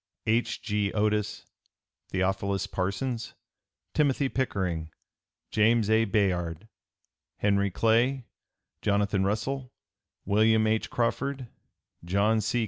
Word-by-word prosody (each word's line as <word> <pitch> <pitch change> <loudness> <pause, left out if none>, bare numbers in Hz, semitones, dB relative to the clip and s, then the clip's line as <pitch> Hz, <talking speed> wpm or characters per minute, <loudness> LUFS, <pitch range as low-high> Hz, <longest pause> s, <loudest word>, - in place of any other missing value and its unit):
H. 115 +2 0
G. 105 -2 0
Otis, 105 0 0 0.6
Theophilus 95 +1 0
Parsons, 115 +6 -3 0.6
Timothy 140 -2 +2
Pickering, 90 -12 -2 0.6
James 110 0 +3
A. 110 +1 +4
Bayard, 95 -3 0 0.7
Henry 100 -1 +2
Clay, 120 +6 +2 0.6
Jonathan 100 -1 +1
Russell, 125 +6 -2 0.5
William 110 +2 +4
H. 110 0 0
Crawford, 125 +2 -1 0.5
John 100 +5 +2
C. 115 +3 0
105 Hz, 90 wpm, -28 LUFS, 100-115 Hz, 0.7 s, A